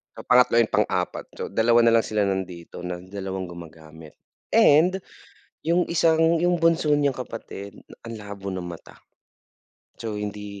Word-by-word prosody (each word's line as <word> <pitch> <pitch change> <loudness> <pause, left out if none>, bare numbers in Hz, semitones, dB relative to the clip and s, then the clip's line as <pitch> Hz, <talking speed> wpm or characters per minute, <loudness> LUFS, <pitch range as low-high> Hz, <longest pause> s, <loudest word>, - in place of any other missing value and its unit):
Yung - - -11
pangatlo, 125 -1 +5
yung 115 -2 +3
pang-4, - - 0
so - - -5
2 115 +1 +4
na 115 - +5
lang - - -2
sila 105 -1 0
nandito 95 -3 -4
na 90 0 -6
dalawang 95 -1 -6
gumagamit 80 -2 -12 0.3
and 180 +6 +4 0.6
yung 170 +2 +3
isang 165 0 +3
yung 175 +2 +2
bunso 165 -2 +3
niyang 145 -1 +2
kapatid 100 -5 -8 0.3
ang 115 - -6
labo 100 -2 -9
ng 95 - -4
mata. 85 -1 -9 1.0
So 110 -1 -5
hindi 105 -1 -6
105 Hz, 145 wpm, -24 LUFS, 95-145 Hz, 1.0 s, pangatlo